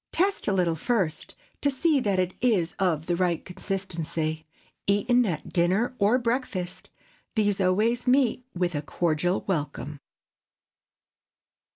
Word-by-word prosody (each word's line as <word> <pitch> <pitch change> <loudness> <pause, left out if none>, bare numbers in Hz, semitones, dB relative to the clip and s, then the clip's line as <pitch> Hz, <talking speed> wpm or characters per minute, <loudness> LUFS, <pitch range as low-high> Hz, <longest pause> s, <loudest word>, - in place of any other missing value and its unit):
Test 390 +3 0
a - - +3
little 180 -4 +2
first, 185 - -1 0.3
to 285 - +3
see 285 +2 +2
that 205 -6 0
it 185 0 0
is 205 -9 +2
of 165 -5 +1
the 175 - 0
right 175 -2 0
consistency. 165 -4 -3 0.4
Eaten 235 +4 +3
at 155 -5 -4
dinner 185 +8 +2
or 210 +4 +4
breakfast, 230 -7 -2 0.5
these 205 -3 +2
always 215 +7 +2
meet 250 -1 +3
with 175 0 0
a 145 - -1
cordial 170 +4 0
welcome. 150 -4 -3
190 Hz, 130 wpm, -26 LUFS, 170-235 Hz, 0.5 s, or